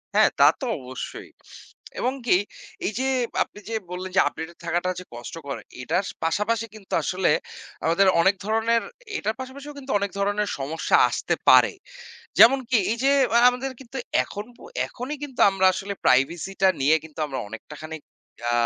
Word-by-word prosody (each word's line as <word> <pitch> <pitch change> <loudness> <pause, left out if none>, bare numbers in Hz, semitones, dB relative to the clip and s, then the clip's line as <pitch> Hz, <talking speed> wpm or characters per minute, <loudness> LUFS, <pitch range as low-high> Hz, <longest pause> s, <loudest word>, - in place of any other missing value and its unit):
হ্যাঁ, - - +6
তা - - +7 0.2
তো 270 - -3
অবশ্যই। 130 0 -7 0.7
এবং 250 +2 0
কি 200 - +5 0.5
এই - - 0
যে 260 - 0 0.4
আপনি - - -15
যে - - -4 0.2
বললেন 185 +1 -5
যে - - +5
updated 160 +1 -6
থাকাটা 175 +2 0
যে - - -8
কষ্টকর 140 +4 -7 0.2
এটার 180 +9 0 0.2
পাশাপাশি 210 +7 0
কিন্তু 205 -3 -11
আসলে 185 +3 +1 0.6
আমাদের 170 +4 +4
অনেক 190 +3 +4
ধরনের; 225 +2 +2 0.4
এটার 215 +2 -2
পাশাপাশিও 280 +3 -8
কিন্তু 270 -1 -6
অনেক 200 -1 -2
ধরনের 205 +1 0
সমস্যা 150 +4 0
আসতে - - -1
পারে। - - +7 0.7
যেমনকি 255 0 +6
এই 230 - -1
যে 275 - +4 0.3
আ - - +7
আমাদের 250 +2 -4
কিন্তু 265 +1 -9 0.3
এখন 205 0 -7
পো - - -16 0.2
এখনই 255 +5 -6
কিন্তু 265 -4 -8
আমরা 190 -1 +1
আসলে 195 +2 -4
privacy 135 +9 +2
টা 190 - +6
নিয়ে 145 +4 +5
কিন্তু 160 -1 -12
আমরা 135 -2 -4
অনেকটাখানি 150 +9 -8 0.5
আ - - +1
195 Hz, 160 wpm, -24 LUFS, 160-235 Hz, 0.7 s, তা